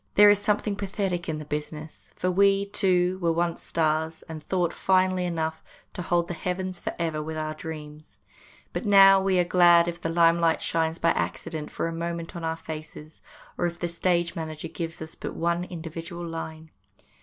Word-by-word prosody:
There 205 Hz, 0 st, +8 dB
is 205 Hz, -, +3 dB
something 205 Hz, 0 st, 0 dB
pathetic 190 Hz, -3 st, -2 dB
in 155 Hz, -, -2 dB
the 150 Hz, -, -7 dB
business; 150 Hz, +1 st, -6 dB
for 185 Hz, -, 0 dB
we, 200 Hz, +1 st, +4 dB
too, 185 Hz, -2 st, +1 dB
were 170 Hz, -1 st, +2 dB
once 170 Hz, 0 st, -1 dB
stars, 160 Hz, 0 st, -1 dB
and 160 Hz, -1 st, -8 dB
thought, 180 Hz, -3 st, 0 dB
finely 185 Hz, -1 st, +2 dB
enough, 160 Hz, -2 st, -2 dB, 0.3 s
to -, -, -5 dB
hold 175 Hz, -1 st, +1 dB
the 175 Hz, -, -4 dB
heavens 180 Hz, +1 st, -3 dB
for -, -, -4 dB
ever 160 Hz, -2 st, -1 dB
with 155 Hz, +1 st, -5 dB
our 155 Hz, 0 st, -2 dB
dreams. 155 Hz, -1 st, -9 dB, 0.6 s
But -, -, -3 dB
now 195 Hz, -2 st, +7 dB
we 190 Hz, -1 st, +2 dB
are 180 Hz, -, +4 dB
glad 175 Hz, -1 st, +5 dB
if 175 Hz, 0 st, -4 dB
the 165 Hz, -, -2 dB
limelight 165 Hz, 0 st, +3 dB
shines 160 Hz, 0 st, 0 dB
by 170 Hz, -, +2 dB
accident 160 Hz, -2 st, -3 dB
for -, -, -2 dB
a 165 Hz, -, -4 dB
moment 170 Hz, 0 st, -4 dB
on 170 Hz, -, -6 dB
our 160 Hz, 0 st, -1 dB
faces, 155 Hz, -1 st, -9 dB, 0.4 s
or -, -, +2 dB
if 170 Hz, 0 st, -6 dB
the 175 Hz, -, -2 dB
stage 170 Hz, 0 st, 0 dB
manager 160 Hz, 0 st, -5 dB
gives 165 Hz, -1 st, -5 dB
us 160 Hz, -, -9 dB
but -, -, -7 dB
one 170 Hz, +1 st, 0 dB
individual 170 Hz, 0 st, -7 dB
line. 160 Hz, -1 st, -7 dB
170 Hz, 190 wpm, -26 LUFS, 160-180 Hz, 0.6 s, There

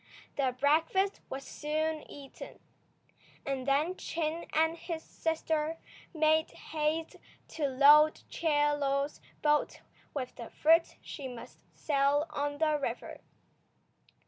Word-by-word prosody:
The 260 Hz, -3 st, 0 dB
breakfast 325 Hz, +7 st, +2 dB
was 270 Hz, +1 st, -5 dB
soon 310 Hz, +1 st, -3 dB
eaten, 280 Hz, -2 st, -11 dB, 0.9 s
and 270 Hz, -1 st, -3 dB
then 300 Hz, +6 st, +2 dB
Chin 330 Hz, -2 st, -3 dB
and 320 Hz, +1 st, +2 dB
his 330 Hz, -1 st, -6 dB
sister 320 Hz, -1 st, -2 dB, 0.3 s
made 315 Hz, -1 st, +3 dB
haste 315 Hz, +1 st, -3 dB, 0.3 s
to 300 Hz, -3 st, -1 dB
load 290 Hz, +3 st, +6 dB
Chie 295 Hz, -3 st, +1 dB
Lo's 280 Hz, 0 st, -1 dB, 0.2 s
boat 300 Hz, 0 st, +2 dB, 0.3 s
with 255 Hz, -3 st, -5 dB
the 235 Hz, -, -7 dB
fruit 330 Hz, +2 st, +3 dB
she 280 Hz, -3 st, -7 dB
must 245 Hz, -2 st, -10 dB, 0.2 s
sell 285 Hz, 0 st, +2 dB
on 290 Hz, -1 st, -2 dB
the 305 Hz, -1 st, +2 dB
river. 245 Hz, -3 st, -5 dB
300 Hz, 115 wpm, -31 LUFS, 280-320 Hz, 0.9 s, load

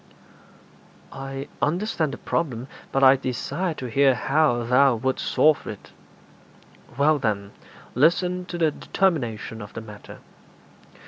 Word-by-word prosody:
'I 135 Hz, +1 st, -6 dB
understand 170 Hz, -1 st, 0 dB
the -, -, -6 dB
problem, 130 Hz, -7 st, -2 dB, 0.2 s
but 135 Hz, -, +1 dB
I 135 Hz, 0 st, +8 dB
desire 140 Hz, +7 st, -3 dB
to 130 Hz, -, -6 dB
hear 135 Hz, +2 st, +3 dB
how 135 Hz, -1 st, +1 dB
thou 125 Hz, +2 st, +4 dB
wouldst 130 Hz, +4 st, -2 dB
solve 155 Hz, -1 st, +3 dB
it.' 105 Hz, -, -9 dB, 1.1 s
'Well, 150 Hz, +1 st, +3 dB
then, 100 Hz, -5 st, -2 dB, 0.4 s
listen 180 Hz, +6 st, +2 dB
to 175 Hz, -, -6 dB
the 160 Hz, -2 st, +2 dB
determination 120 Hz, -, -1 dB
of 105 Hz, -, -10 dB
the 115 Hz, -, -6 dB
matter. 105 Hz, -2 st, -11 dB
135 Hz, 125 wpm, -24 LUFS, 120-155 Hz, 1.1 s, I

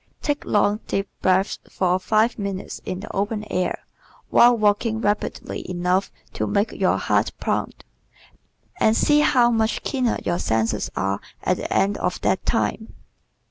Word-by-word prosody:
Take 290 Hz, -1 st, -1 dB
long, 205 Hz, 0 st, +2 dB
deep 195 Hz, 0 st, -1 dB
breaths 190 Hz, +1 st, +2 dB
for 185 Hz, 0 st, +1 dB
five 220 Hz, +4 st, +1 dB
minutes 200 Hz, -2 st, -5 dB
in 185 Hz, +1 st, -4 dB
the 215 Hz, -, -8 dB
open 210 Hz, +2 st, -1 dB
air 180 Hz, -1 st, -1 dB, 0.5 s
while 240 Hz, 0 st, +6 dB
walking 215 Hz, +1 st, +1 dB
rapidly 210 Hz, -2 st, -2 dB
enough 180 Hz, +2 st, 0 dB, 0.2 s
to -, -, -2 dB
make 205 Hz, +1 st, +1 dB
your -, -, +1 dB
heart -, -, +1 dB
pound, -, -, -2 dB, 0.9 s
and 220 Hz, +1 st, +3 dB
see 295 Hz, 0 st, +4 dB
how 245 Hz, -5 st, +4 dB
much 225 Hz, -1 st, 0 dB
keener 255 Hz, -4 st, 0 dB
your 175 Hz, 0 st, 0 dB
senses 110 Hz, -1 st, 0 dB
are 95 Hz, +1 st, -1 dB, 0.2 s
at -, -, +1 dB
the -, -, -5 dB
end 200 Hz, +1 st, +2 dB
of 180 Hz, -, -1 dB
that 190 Hz, -, +1 dB
time. 225 Hz, -1 st, -1 dB
205 Hz, 150 wpm, -23 LUFS, 185-225 Hz, 0.9 s, while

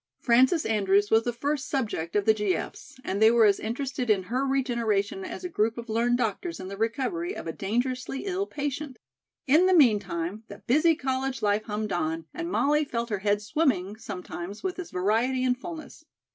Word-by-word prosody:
Frances 260 Hz, +7 st, +3 dB
Andrews 205 Hz, -1 st, +2 dB
was 225 Hz, +1 st, +4 dB
the 240 Hz, -, +1 dB
first 280 Hz, +3 st, -2 dB
"subject" 210 Hz, -, -2 dB
of 205 Hz, -1 st, +2 dB
the 220 Hz, -, +6 dB
G.F.'s, 210 Hz, +4 st, -3 dB
and 200 Hz, +2 st, -2 dB
they 220 Hz, -, +8 dB
were 230 Hz, -1 st, +5 dB
as 200 Hz, -2 st, +4 dB
interested 250 Hz, +2 st, -3 dB
in 200 Hz, -3 st, +3 dB
her 260 Hz, +2 st, +1 dB
regeneration 230 Hz, -7 st, 0 dB
as -, -, -7 dB
a -, -, -2 dB
group 225 Hz, -9 st, 0 dB
of 235 Hz, 0 st, -7 dB
learned 235 Hz, +2 st, +2 dB
doctors 245 Hz, -, -2 dB
in 185 Hz, 0 st, -7 dB
the 200 Hz, -, -6 dB
recovery 265 Hz, -, -2 dB
of -, -, -7 dB
a 165 Hz, -, -4 dB
dangerously 255 Hz, -, -2 dB
ill 390 Hz, +1 st, -1 dB
patient. 285 Hz, -1 st, -4 dB, 0.5 s
In 315 Hz, +7 st, +5 dB
the 375 Hz, -, +4 dB
meantime, 210 Hz, -, +2 dB
the -, -, -12 dB
busy 310 Hz, +6 st, +4 dB
college 260 Hz, -2 st, -2 dB
life 210 Hz, +1 st, +1 dB
hummed 210 Hz, 0 st, -3 dB
on 160 Hz, -1 st, -2 dB
and 340 Hz, 0 st, -4 dB
Molly 300 Hz, -3 st, +2 dB
felt 235 Hz, -4 st, -3 dB
her 205 Hz, -, -1 dB
head 205 Hz, +1 st, +1 dB
swimming 210 Hz, -, 0 dB
sometimes 190 Hz, -2 st, -7 dB
with 375 Hz, -1 st, -3 dB
its 360 Hz, -, -6 dB
variety 225 Hz, +8 st, +1 dB
and 250 Hz, -1 st, +2 dB
fullness. 315 Hz, +1 st, -9 dB
235 Hz, 190 wpm, -27 LUFS, 205-275 Hz, 0.5 s, they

